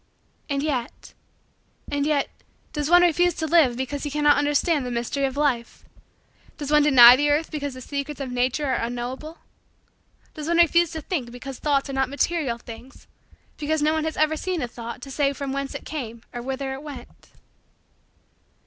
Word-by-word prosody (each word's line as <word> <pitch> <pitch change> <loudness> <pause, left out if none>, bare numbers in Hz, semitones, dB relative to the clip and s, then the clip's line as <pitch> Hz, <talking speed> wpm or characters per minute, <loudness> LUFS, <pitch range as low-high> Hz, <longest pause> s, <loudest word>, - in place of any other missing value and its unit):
And 280 0 -1
yet 260 -6 -4 0.8
and 285 0 0
yet 290 -3 +1 0.5
does 295 0 -2
one 355 +1 +7
refuse 350 0 +3
to 320 - -2
live 300 -7 +4
because 265 +2 -3
he 295 - -3
cannot 295 0 +3
understand 290 +1 +1
the 250 - -4
mystery 240 +3 -1
of 270 0 -3
life? 255 -6 -1 0.7
Does 290 -2 -5
one 300 0 +6
deny 250 -4 +9
the 290 +3 +1
earth 300 +2 +1
because 285 -3 -4
the 255 - -9
secrets 280 +2 -5
of 265 -2 -4
Mature 255 +3 0
are 240 - -1
unknowable? 245 +7 -5 1.0
Does 305 -1 -7
one 340 0 +1
refuse 340 0 +4
to 320 - -5
think 295 -9 -3
because 245 +2 -8
thoughts 285 -2 +1
are 275 - -6
not 265 -1 0
material 285 -3 -1
things 235 +3 -12 0.5
because 305 0 -1
no 305 +1 +3
one 315 0 -1
has 315 - -3
ever 310 0 +2
seen 350 -1 -3
a - - -2
thought 235 +1 -8
to 275 - -8
say 280 0 +1
from 275 -1 -4
whence 275 0 -4
it - - -7
came 235 -6 -6
or 240 - -5
whither 265 +1 -4
it 265 - -7
went? 285 -5 -11
280 Hz, 185 wpm, -24 LUFS, 255-305 Hz, 1.0 s, deny